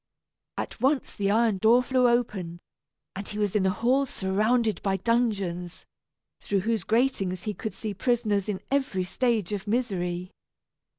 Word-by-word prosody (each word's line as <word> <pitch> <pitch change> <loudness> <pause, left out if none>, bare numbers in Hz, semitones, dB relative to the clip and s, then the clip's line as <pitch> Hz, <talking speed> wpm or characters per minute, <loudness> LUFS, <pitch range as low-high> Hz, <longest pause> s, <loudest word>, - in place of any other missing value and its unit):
At - - -5
once 265 +1 +1
the 200 -1 -1
iron 220 -2 +2
door 230 +5 +5
flew 255 -1 +3
open, 195 -8 -1 0.6
and 195 +1 -5
he 210 - -5
was 205 -2 0
in 195 -2 +3
a - - +3
hall 250 +7 +1
surrounded 215 +3 +1
by 195 -1 0
dungeons, 195 -6 -1 0.5
through 200 -1 -1
whose 220 -1 -1
gratings 200 -5 0
he 210 - -2
could 215 -1 -6
see 210 +1 -4
prisoners 210 -2 0
in 195 -3 -2
every 265 -10 0
stage 215 0 0
of 200 0 -4
misery. 185 -6 -1
210 Hz, 155 wpm, -27 LUFS, 190-240 Hz, 0.6 s, door